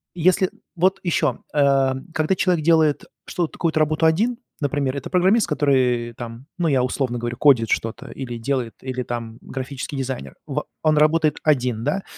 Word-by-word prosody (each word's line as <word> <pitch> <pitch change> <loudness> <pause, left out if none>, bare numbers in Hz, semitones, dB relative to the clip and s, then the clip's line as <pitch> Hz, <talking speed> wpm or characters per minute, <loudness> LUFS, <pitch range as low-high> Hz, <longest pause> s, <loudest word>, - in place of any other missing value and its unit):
если 185 +2 +2 0.2
вот 190 +3 +2
еще, 155 -7 +1
э, 140 -2 +3 0.2
когда 155 +4 +1
человек 180 -4 +1
делает 160 -3 +3 0.2
что-то, 170 -3 -2
какую-то 165 -2 0
работу 155 +1 +2
один, 220 +10 +2 0.2
например, 140 -1 0
это - - -6
программист, 190 +3 +3
который, 130 -6 +1
э, - - -17
там, 120 +3 -8
ну, 175 -2 +1
я 135 -4 +2
условно 125 -1 -1
говорю, 120 +1 -4
кодит 125 -7 +4
что-то 115 0 -2
или 120 -3 -6
делает, 120 -1 -2
или 130 -1 -3
там 115 -2 -5
графический 135 +1 -6
дизайнер, 130 -1 -4
во 150 +1 -3 0.2
он 155 -1 +3
работает 155 0 +3
один, 125 -7 +1
да? 195 +9 -1
140 Hz, 170 wpm, -22 LUFS, 125-160 Hz, 0.2 s, кодит